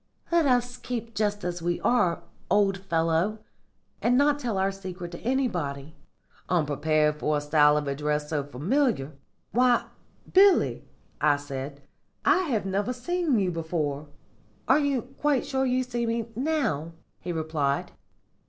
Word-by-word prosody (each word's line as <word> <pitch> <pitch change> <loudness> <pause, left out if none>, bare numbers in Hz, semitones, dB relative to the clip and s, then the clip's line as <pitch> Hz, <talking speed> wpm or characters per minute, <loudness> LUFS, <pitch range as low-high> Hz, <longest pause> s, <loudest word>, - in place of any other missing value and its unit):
Let 335 -3 +4
us 245 -1 +1
keep 230 -2 -5
just 205 -2 -1
as 175 0 -3
we 175 +1 -1
are, 185 -9 +2 0.3
old 200 -2 +3
fellow, 170 +2 0 0.6
and 245 +1 +3
not 290 +1 +3
tell 235 -7 -2
our 190 +1 +1
secret 185 -3 -7
to 170 - -8
anybody.' 170 - -2 0.6
"Unprepared 150 -1 +1
for 150 0 +1
a - - -2
style 150 0 +4
of 150 -1 -2
address 150 +2 -2
so 150 -3 0
familiar, 155 - 0 0.4
'Why, 245 0 +3 0.5
Billy,' 390 0 +5 0.4
I 150 0 +4
said, 140 0 -7 0.4
'I - - +6
have 225 - -1
never 200 +5 -1
seen 330 +1 0
you 190 -3 +1
before.' 155 -3 -3 0.6
"'Are 265 +3 +5
you 280 -4 0
quite 270 +1 -1
sure 265 -1 0
you 255 +1 +1
see 240 -2 -2
me 230 0 -2
now?' 240 - -1 0.3
he 175 - -5
replied. 155 -4 -1
190 Hz, 145 wpm, -27 LUFS, 150-250 Hz, 0.6 s, I